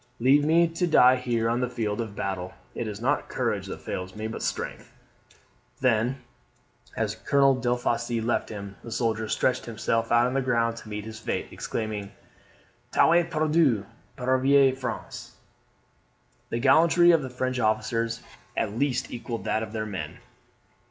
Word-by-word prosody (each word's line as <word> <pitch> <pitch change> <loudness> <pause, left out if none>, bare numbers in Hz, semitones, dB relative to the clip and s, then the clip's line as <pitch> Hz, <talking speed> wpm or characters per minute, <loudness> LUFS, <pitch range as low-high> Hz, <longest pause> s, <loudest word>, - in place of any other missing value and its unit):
Leave 135 +5 +5
me 165 +3 +4
to 165 +2 -1
die 130 -5 +6
here 120 -3 -1
on 120 +1 +1
the 125 -1 -1
field 110 -3 -2
of 110 -3 -6
battle. 95 -2 -4 0.2
It 115 - -4
is 105 -1 -5
not 135 +5 0
courage - - -1
that - - -7
fails 90 0 -5
me, 110 +1 -5
but 110 - -5
strength." - - -4 0.9
Then, 125 +1 +1 0.7
as - - 0
Colonel 140 -1 +3
Delafosse 120 -1 -1
left 115 +2 -1
him, 100 -2 -7
the 115 - -8
soldier 110 -1 -1
stretched 130 -1 0
himself 115 0 -1
on 120 +2 +4
the 135 - +1
ground 115 -2 +1
to 110 - -10
meet 105 0 -5
his 110 -1 -8
fate, - - -3
exclaiming, 105 -3 -4 0.8
"Tout 165 - +5
est 175 -1 +3
perdu! 155 -9 +2 0.3
pauvre 130 +1 +4
France!" 125 -4 -6 1.1
The - - -2
gallantry 165 +7 +5
of 165 -2 +4
the 130 - -5
French 130 0 -2
officers 115 +1 0 0.3
at 100 - -1
least 140 -3 0
equalled 120 -1 -5
that 110 - 0
of 110 -1 -5
their 110 -1 -3
men. 90 -6 -5
120 Hz, 160 wpm, -26 LUFS, 110-130 Hz, 1.1 s, die